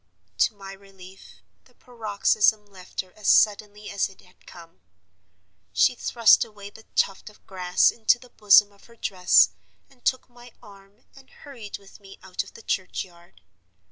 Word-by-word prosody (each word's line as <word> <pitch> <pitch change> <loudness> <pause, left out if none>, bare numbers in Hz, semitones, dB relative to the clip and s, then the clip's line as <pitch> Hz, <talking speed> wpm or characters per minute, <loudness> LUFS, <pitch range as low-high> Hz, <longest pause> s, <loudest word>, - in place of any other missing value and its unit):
To 215 - +2
my 195 -1 -10
relief, 195 -1 -16 0.2
the - - -26
paroxysm 215 -2 0
left 190 -3 -8
her 185 -1 -22
as 210 -2 -8
suddenly 210 0 +2
as 200 0 -1
it 195 - -19
had 180 - -25
come. 165 -1 -15 0.9
She - - +3
thrust 235 -2 +3
away 205 -3 -12
the 220 - -17
tuft 195 +2 -1
of 210 - -23
grass 180 -2 +1
into 230 +2 +2
the 250 0 -18
bosom 205 0 +5
of 200 - -23
her 235 - -19
dress, 180 - +3 0.4
and 255 -3 -26
took 260 - -1
my 240 -1 -17
arm 200 0 -19
and 270 -1 -18
hurried 235 -8 -11
with 195 +1 -18
me 195 -1 -15
out 190 -1 -4
of - - -18
the 225 - -14
churchyard. 175 - -6
205 Hz, 165 wpm, -24 LUFS, 190-220 Hz, 0.9 s, bosom